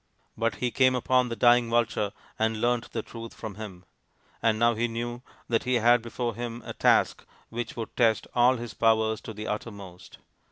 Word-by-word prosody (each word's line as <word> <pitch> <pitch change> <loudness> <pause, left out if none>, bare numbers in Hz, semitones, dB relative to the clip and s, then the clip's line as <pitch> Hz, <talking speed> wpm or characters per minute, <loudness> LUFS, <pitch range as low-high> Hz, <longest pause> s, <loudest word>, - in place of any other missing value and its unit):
But 115 -2 0
he 125 +3 -1
came 130 0 +4
upon 125 0 +2
the 115 - -3
dying 120 0 +4
vulture 115 -3 +1 0.3
and 110 0 +1
learnt 120 +1 0
the - - -3
truth 115 -1 -9
from 110 - -7
him; 95 -3 -9 0.6
and 110 -1 +2
now 120 +1 +4
he 115 +2 0
knew 120 +1 -4 0.3
that 115 -1 +1
he 125 0 +1
had 120 +1 +5
before 120 0 -3
him 120 +1 -6
a - - -5
task - - +3 0.3
which 115 0 -5
would 115 -2 -6
test 115 -3 +3
all 125 +1 +4
his 120 -2 -7
powers 110 -1 +2
to - - -7
the 105 +1 -6
uttermost. 100 -5 -7
115 Hz, 190 wpm, -27 LUFS, 110-120 Hz, 0.6 s, had